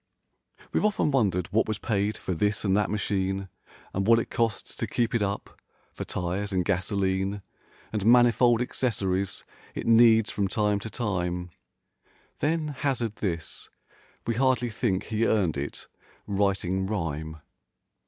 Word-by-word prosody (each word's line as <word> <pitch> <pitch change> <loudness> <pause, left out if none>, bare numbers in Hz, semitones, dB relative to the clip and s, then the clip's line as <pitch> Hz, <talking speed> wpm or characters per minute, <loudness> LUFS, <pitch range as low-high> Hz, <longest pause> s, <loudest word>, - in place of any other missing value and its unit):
43 - - -21
We've - - +2
often 205 -7 +2
wondered 95 -10 +1
what 110 - +3
was 110 -1 -1
paid 105 -1 -1
for 95 - -3
this 105 +5 0
and 95 -1 +3
that 105 -1 +2
machine, 95 -2 -1 0.4
And 95 +1 -1
what 115 0 +7
it 115 - -2
costs 115 -3 -1
to - - -2
keep 120 -1 0
it 115 - +1
up: 100 0 -3 0.3
for - - -5
tires 95 +3 -3
and 90 -2 0
gasoline 95 0 0 0.5
And 105 -2 -1
manifold 120 0 +5
accessories 100 -7 -1 0.3
it - - -4
needs 115 -1 +6
from 100 -1 0
time 105 -1 +1
to 110 - -6
time— 90 -6 -2 0.9
Then 155 0 0
hazard 130 -6 -2
this: 85 -5 -4 0.6
"We 115 - 0
hardly 125 -1 +2
think 105 -4 0
he 110 0 0
earned 95 -7 +2
it 70 +1 -5 0.4
writing 95 -2 0
rhyme!" 80 -6 -3
105 Hz, 145 wpm, -27 LUFS, 95-115 Hz, 0.9 s, what